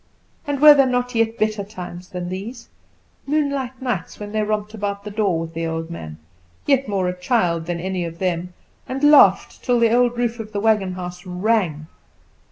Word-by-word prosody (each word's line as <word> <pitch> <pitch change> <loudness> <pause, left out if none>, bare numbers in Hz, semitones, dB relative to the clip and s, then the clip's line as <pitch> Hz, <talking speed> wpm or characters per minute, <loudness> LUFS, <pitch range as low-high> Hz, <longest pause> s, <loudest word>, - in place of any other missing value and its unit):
And 285 -1 -1
were 300 +1 +10
there 275 -2 +4
not 250 0 -1
yet 230 0 +1
better 215 -1 0
times 180 -3 -9
than 180 -1 -5
these? 220 +6 -7 0.6
Moonlight 280 -4 -1
nights, 245 -9 -3
when 205 0 -7
they 215 0 0
romped 210 0 -2
about 200 -2 -4
the 210 - -7
door, 200 -5 0
with 165 0 -6
the 165 0 -3
old 165 +1 -4
man, 80 - -8 0.5
yet 275 -1 +2
more 195 -3 0
a 180 - -2
child 180 -4 0
than 175 -1 -2
any 185 0 -2
of 165 0 -7
them, 180 -1 -2 0.3
and 270 +2 -4
laughed, 295 0 +5
till 245 -2 +2
the 230 -1 +3
old 245 0 +3
roof 240 -1 -1
of 215 -1 -7
the 205 - -1
wagon 210 -3 +2
house 180 0 -7
rang? 180 -4 0
205 Hz, 190 wpm, -21 LUFS, 180-240 Hz, 0.6 s, were